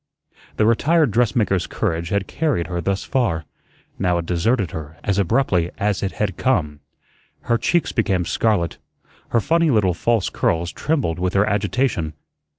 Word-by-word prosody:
The 110 Hz, -, +3 dB
retired 145 Hz, +5 st, +3 dB
dressmaker's 110 Hz, -5 st, +1 dB
courage 85 Hz, +1 st, -2 dB
had 100 Hz, -1 st, 0 dB
carried 145 Hz, -, -1 dB
her 90 Hz, -1 st, -3 dB
thus 95 Hz, +3 st, -1 dB
far; 95 Hz, -, 0 dB, 0.5 s
now 90 Hz, -2 st, +1 dB
it 85 Hz, -, -3 dB
deserted 90 Hz, +4 st, 0 dB
her 80 Hz, 0 st, -7 dB
as 100 Hz, 0 st, 0 dB
abruptly 95 Hz, -4 st, +1 dB
as 105 Hz, 0 st, 0 dB
it 95 Hz, -, -2 dB
had 100 Hz, -4 st, -2 dB
come. 75 Hz, -, 0 dB, 0.6 s
Her 115 Hz, -1 st, 0 dB
cheeks 175 Hz, -1 st, +1 dB
became 95 Hz, -6 st, 0 dB
scarlet; 100 Hz, -7 st, 0 dB, 0.5 s
her 115 Hz, -, +2 dB
funny 165 Hz, +6 st, +2 dB
little 105 Hz, -8 st, +3 dB
false 115 Hz, +3 st, 0 dB
curls 85 Hz, +1 st, 0 dB
trembled 140 Hz, -, -1 dB
with 90 Hz, +1 st, -1 dB
her 100 Hz, +1 st, +4 dB
agitation. 105 Hz, -, 0 dB
100 Hz, 155 wpm, -21 LUFS, 85-120 Hz, 0.6 s, her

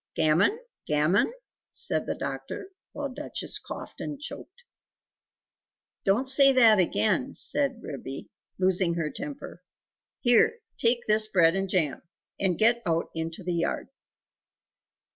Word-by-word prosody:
"Gammon? 160 Hz, -, +3 dB, 0.3 s
Gammon?" 150 Hz, -, +2 dB, 0.4 s
said -, -, 0 dB
the -, -, -1 dB
doctor, 390 Hz, -, -6 dB, 0.2 s
while 285 Hz, -1 st, -4 dB
Duchess -, -, -4 dB
coughed -, -, -9 dB
and 295 Hz, -2 st, -5 dB
choked. 375 Hz, +9 st, -8 dB, 1.4 s
"Don't 215 Hz, +7 st, +2 dB
say 275 Hz, +1 st, +6 dB
that 225 Hz, -5 st, +6 dB
again!" 220 Hz, -, +1 dB
said 275 Hz, -4 st, -1 dB
Ribby, 135 Hz, -1 st, -7 dB, 0.3 s
losing 185 Hz, -2 st, +2 dB
her 160 Hz, -3 st, -2 dB
temper 285 Hz, -1 st, -8 dB, 0.6 s
"Here, 245 Hz, -, +4 dB, 0.2 s
take 240 Hz, +1 st, +2 dB
this 215 Hz, 0 st, +3 dB
bread 170 Hz, -5 st, +4 dB
and 195 Hz, 0 st, -2 dB
jam, 160 Hz, -8 st, 0 dB, 0.4 s
and 185 Hz, -4 st, +1 dB
get 235 Hz, +2 st, +4 dB
out 165 Hz, -2 st, -1 dB
into 165 Hz, +3 st, -5 dB
the 175 Hz, 0 st, -2 dB
yard!" 170 Hz, +7 st, -2 dB
205 Hz, 125 wpm, -27 LUFS, 170-260 Hz, 1.4 s, say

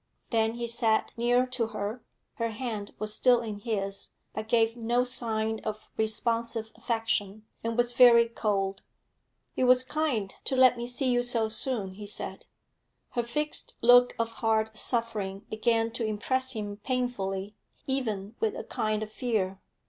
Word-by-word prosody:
Then 225 Hz, -1 st, +2 dB
he 240 Hz, 0 st, -3 dB
sat 230 Hz, -2 st, +1 dB
near 245 Hz, +2 st, +3 dB
to 250 Hz, -3 st, -2 dB
her; 220 Hz, +2 st, -5 dB, 0.3 s
her 230 Hz, -1 st, -1 dB
hand 220 Hz, -3 st, -5 dB
was 215 Hz, 0 st, -2 dB
still 245 Hz, +2 st, +4 dB
in 215 Hz, -3 st, -5 dB
his, 200 Hz, -3 st, -3 dB, 0.2 s
but 215 Hz, 0 st, -5 dB
gave 225 Hz, 0 st, +2 dB
no 240 Hz, +1 st, +1 dB
sign 220 Hz, -3 st, -1 dB
of 215 Hz, -1 st, -6 dB
responsive 230 Hz, 0 st, 0 dB
affection, 220 Hz, -3 st, -1 dB, 0.2 s
and 230 Hz, 0 st, -2 dB
was 240 Hz, 0 st, +3 dB
very 235 Hz, -2 st, +7 dB
cold. 200 Hz, -4 st, -1 dB, 0.7 s
'It 255 Hz, -, +2 dB
was 255 Hz, 0 st, +6 dB
kind 260 Hz, -8 st, -1 dB
to 265 Hz, -, -1 dB
let 255 Hz, -1 st, +6 dB
me 240 Hz, 0 st, -5 dB
see 250 Hz, +1 st, +2 dB
you 245 Hz, 0 st, +3 dB
so 235 Hz, -2 st, +1 dB
soon,' 220 Hz, -4 st, -1 dB
he 205 Hz, +1 st, -9 dB
said. 205 Hz, -, -3 dB, 0.7 s
Her 240 Hz, -, 0 dB
fixed 300 Hz, +6 st, -3 dB
look 245 Hz, +1 st, +7 dB
of 230 Hz, 0 st, 0 dB
hard 220 Hz, -1 st, +1 dB
suffering 215 Hz, -5 st, -1 dB
began 225 Hz, +1 st, +1 dB
to 235 Hz, 0 st, -3 dB
impress 260 Hz, +5 st, +1 dB
him 205 Hz, -2 st, -5 dB
painfully, 210 Hz, -5 st, -2 dB, 0.3 s
even 220 Hz, -7 st, -2 dB
with 220 Hz, -, 0 dB
a -, -, -5 dB
kind 215 Hz, 0 st, -1 dB
of 215 Hz, -, -8 dB
fear. 205 Hz, -6 st, -2 dB
225 Hz, 155 wpm, -28 LUFS, 215-245 Hz, 0.7 s, very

